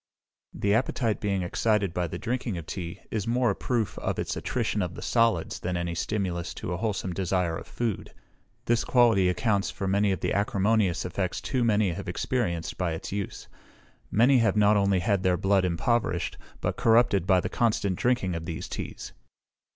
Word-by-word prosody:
The 100 Hz, 0 st, 0 dB
appetite 115 Hz, -1 st, 0 dB
being 100 Hz, -3 st, 0 dB
excited 100 Hz, 0 st, +1 dB
by 90 Hz, -1 st, -1 dB
the -, -, -5 dB
drinking 120 Hz, -4 st, -2 dB
of 85 Hz, -, -6 dB
tea, 85 Hz, -1 st, -6 dB
is 110 Hz, -1 st, -2 dB
more 120 Hz, -1 st, +2 dB
a -, -, -3 dB
proof 120 Hz, -4 st, -2 dB
of -, -, -2 dB
its -, -, -2 dB
attrition 105 Hz, -, -1 dB
of 90 Hz, -1 st, -3 dB
the -, -, -8 dB
solids 115 Hz, -2 st, +1 dB
than 90 Hz, 0 st, -2 dB
any 85 Hz, 0 st, -2 dB
stimulus 90 Hz, -1 st, -2 dB
to 90 Hz, -, -4 dB
a -, -, -2 dB
wholesome 95 Hz, -4 st, -2 dB
desire 90 Hz, -2 st, 0 dB
of -, -, -8 dB
food. 115 Hz, -5 st, -3 dB, 0.5 s
This 120 Hz, 0 st, +2 dB
quality 115 Hz, -7 st, +4 dB
accounts 100 Hz, +1 st, +1 dB
for 100 Hz, -, -5 dB
the 95 Hz, -1 st, +1 dB
acrimonious 100 Hz, -2 st, +1 dB
effects 90 Hz, +1 st, -2 dB
too 120 Hz, +9 st, -1 dB
many 105 Hz, -4 st, +2 dB
have 95 Hz, +2 st, -5 dB
experienced 90 Hz, -3 st, -2 dB
by 90 Hz, -3 st, 0 dB
its 80 Hz, -, -6 dB
use. 100 Hz, 0 st, -4 dB, 0.6 s
Many 125 Hz, +4 st, +4 dB
have 115 Hz, -2 st, +2 dB
not 105 Hz, 0 st, +5 dB
only 100 Hz, -2 st, +2 dB
had 100 Hz, -1 st, +1 dB
their 90 Hz, -2 st, +2 dB
blood 95 Hz, 0 st, +2 dB
impoverished, 90 Hz, +1 st, 0 dB, 0.3 s
but -, -, -1 dB
corrupted 110 Hz, -5 st, +3 dB
by 95 Hz, -2 st, +5 dB
the -, -, -2 dB
constant 105 Hz, -5 st, +1 dB
drinking 120 Hz, -5 st, +1 dB
of 85 Hz, -1 st, -4 dB
these 80 Hz, -2 st, -4 dB
teas. -, -, -6 dB
100 Hz, 180 wpm, -27 LUFS, 90-110 Hz, 0.6 s, not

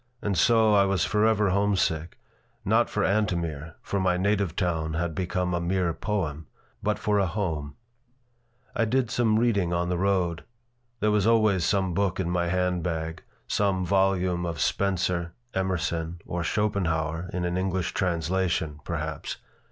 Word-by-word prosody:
And 105 Hz, -4 st, -1 dB
so 110 Hz, +4 st, +4 dB
I 100 Hz, -1 st, +5 dB
was 95 Hz, -3 st, +1 dB
forever 105 Hz, -2 st, +2 dB
homesick, 95 Hz, -5 st, 0 dB, 0.5 s
not -, -, +3 dB
for -, -, -1 dB
Antomir 85 Hz, -7 st, -1 dB
for 100 Hz, -, -2 dB
my 90 Hz, -1 st, +2 dB
native 100 Hz, -2 st, 0 dB
town 80 Hz, -4 st, -1 dB
had 85 Hz, 0 st, -1 dB
become 90 Hz, +1 st, -1 dB
a 85 Hz, -, 0 dB
mere 90 Hz, -1 st, 0 dB
poem 80 Hz, -7 st, -3 dB, 0.3 s
but -, -, 0 dB
for 105 Hz, -1 st, +1 dB
a 95 Hz, -, +2 dB
home 80 Hz, -7 st, -3 dB, 1.0 s
I 115 Hz, -, +2 dB
did 125 Hz, +1 st, 0 dB
some 110 Hz, -3 st, +2 dB
reading 100 Hz, -7 st, +2 dB
on 85 Hz, 0 st, 0 dB
the 90 Hz, -1 st, -1 dB
road. 90 Hz, -3 st, +1 dB, 0.6 s
There 105 Hz, -, +3 dB
was 105 Hz, 0 st, +2 dB
always 110 Hz, -6 st, +3 dB
some 95 Hz, -3 st, +1 dB
book 95 Hz, 0 st, 0 dB
in 85 Hz, -2 st, -1 dB
my 85 Hz, -1 st, 0 dB
hand 90 Hz, 0 st, 0 dB
bag 80 Hz, -1 st, -3 dB, 0.3 s
some 95 Hz, -3 st, +1 dB
volume 95 Hz, -2 st, +2 dB
of 85 Hz, -3 st, -3 dB
Spencer, 90 Hz, -3 st, 0 dB, 0.2 s
Emerson, 85 Hz, -3 st, -1 dB
or 85 Hz, 0 st, -3 dB
Schopenhauer 85 Hz, -4 st, -1 dB
(in 90 Hz, -1 st, -2 dB
an 90 Hz, 0 st, -1 dB
English 95 Hz, -1 st, -1 dB
translation), 85 Hz, -3 st, 0 dB
perhaps. 80 Hz, -3 st, -4 dB
90 Hz, 150 wpm, -26 LUFS, 85-100 Hz, 1.0 s, I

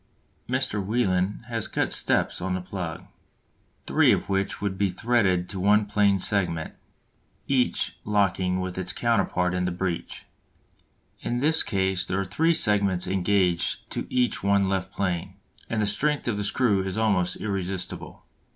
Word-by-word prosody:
Mr. 130 Hz, -6 st, 0 dB
Welin 100 Hz, -2 st, 0 dB
has 115 Hz, -3 st, -2 dB
cut -, -, -1 dB
steps -, -, +1 dB
on 90 Hz, +1 st, -1 dB
the -, -, -2 dB
plug, 90 Hz, -2 st, -6 dB, 0.8 s
three -, -, +4 dB
of -, -, 0 dB
which 95 Hz, 0 st, -1 dB
would 100 Hz, -2 st, -2 dB
be 100 Hz, 0 st, +1 dB
threaded 95 Hz, -3 st, +1 dB
to 95 Hz, -, -6 dB
one 105 Hz, +3 st, +4 dB
plane 105 Hz, -1 st, +3 dB
segment, 90 Hz, -4 st, -1 dB, 0.7 s
each 130 Hz, -2 st, 0 dB
locking 95 Hz, -3 st, +1 dB
with 95 Hz, 0 st, -4 dB
its 90 Hz, -1 st, -3 dB
counterpart 90 Hz, -6 st, +1 dB
in 90 Hz, 0 st, 0 dB
the 90 Hz, -, -1 dB
breech. 90 Hz, -1 st, -4 dB, 0.9 s
In 120 Hz, -, -2 dB
this 155 Hz, +5 st, +4 dB
case 95 Hz, -3 st, 0 dB
there 95 Hz, +1 st, -2 dB
are 100 Hz, -, -1 dB
three 160 Hz, -, +2 dB
segments 100 Hz, -, +2 dB
engaged 90 Hz, -2 st, +1 dB
to -, -, -3 dB
each 125 Hz, -1 st, +1 dB
one 100 Hz, 0 st, +2 dB
left 95 Hz, -1 st, -2 dB
plane, 95 Hz, -1 st, -2 dB, 0.3 s
and 115 Hz, -, -1 dB
the 105 Hz, -, +2 dB
strength 145 Hz, +9 st, 0 dB
of 120 Hz, -, 0 dB
the 105 Hz, -, -2 dB
screw 100 Hz, -1 st, +2 dB
is 95 Hz, +1 st, -4 dB
almost 100 Hz, -5 st, +1 dB
irresistible. 95 Hz, -3 st, -4 dB
100 Hz, 155 wpm, -25 LUFS, 90-105 Hz, 0.9 s, three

